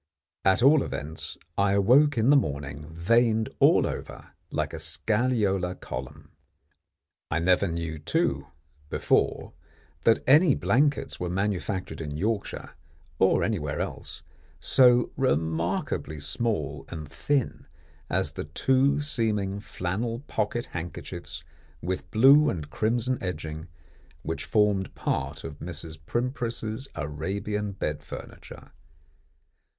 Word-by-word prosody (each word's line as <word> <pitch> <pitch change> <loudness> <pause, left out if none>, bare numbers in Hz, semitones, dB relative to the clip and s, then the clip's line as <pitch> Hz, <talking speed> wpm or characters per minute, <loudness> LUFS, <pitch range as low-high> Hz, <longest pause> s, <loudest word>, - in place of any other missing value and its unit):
At 95 +4 +4
all 145 +2 +7
events 80 - -5 0.2
I 100 0 +3
awoke 125 +8 +5
in 115 +5 +4
the - - +7
morning 75 - -1
veined 110 +6 +2
all - - +5
over - - -6 0.2
like - - -2
a - - -5
scagliola 105 -6 0
column. 65 +1 -7 1.0
I 80 - 0
never 90 +3 +3
knew, 85 -2 -3
too, 75 - 0 0.4
before, - - +1 0.5
that 115 - +4
any 150 +2 +6
blankets 145 +3 +1
were 90 - -2
manufactured 95 -2 -2
in 75 -2 -4
Yorkshire, 105 +4 -2 0.5
or 95 - +4
elsewhere, 75 -9 -1 0.6
so 125 -2 +4
remarkably 80 0 -1
small 75 - -2
and 80 -3 -6
thin 130 - -1 0.4
as - - 0
the - - -5
two 135 - +2
seeming 105 -8 -1
flannel 105 +4 -3
pocket 120 -3 -2
handkerchiefs 85 -2 -6 0.4
with 90 +2 -4
blue 140 +6 +6
and 75 -4 -4
crimson 120 +3 0
edging, 80 -3 -5 0.6
which 80 0 -3
formed 105 -3 +1
part - - -2
of 75 - -8
Mrs. 80 -2 -6
Primpris's 120 -1 -2
Arabian 100 +8 -3
bed 75 -5 -3
furniture. 75 - -10
100 Hz, 110 wpm, -27 LUFS, 80-120 Hz, 1.0 s, all